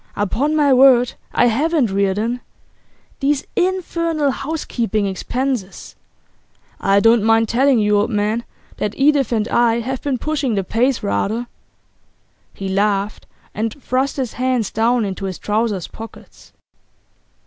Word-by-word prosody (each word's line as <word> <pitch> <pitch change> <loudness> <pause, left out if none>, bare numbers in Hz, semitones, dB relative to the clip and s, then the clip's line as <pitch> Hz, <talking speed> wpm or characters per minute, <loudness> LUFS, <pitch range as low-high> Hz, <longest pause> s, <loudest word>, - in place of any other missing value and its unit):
Upon 255 +10 0
my 290 -3 +4
word, 250 -2 +5 0.2
I - - +3
haven't, 275 - +1
Reardon! 200 +5 0 0.8
These 280 +1 0
infernal 335 -5 0
housekeeping 245 -7 -2
expenses! 235 +2 -3 0.8
I 195 +1 +3
don't 225 +2 +4
mind 225 0 +3
telling 265 +2 +3
you, 210 -1 +3
old 210 +3 0
man, 215 +1 0 0.3
that 210 - -2
Edith 275 -3 +3
and 220 -2 0
I 235 -1 +2
have 260 +2 -4
been 275 -3 -1
pushing 280 -4 -1
the 195 - 0
pace 240 +7 0
rather.' 200 - -1 1.1
He 195 - -6
laughed, 200 +1 -1 0.3
and 220 +5 -3
thrust 260 +2 -1
his 255 -4 -2
hands 250 -4 -1
down 230 +1 +1
into 195 0 -4
his 185 -2 -4
trousers 210 -3 -1
pockets. 225 0 -12
235 Hz, 130 wpm, -19 LUFS, 210-270 Hz, 1.1 s, word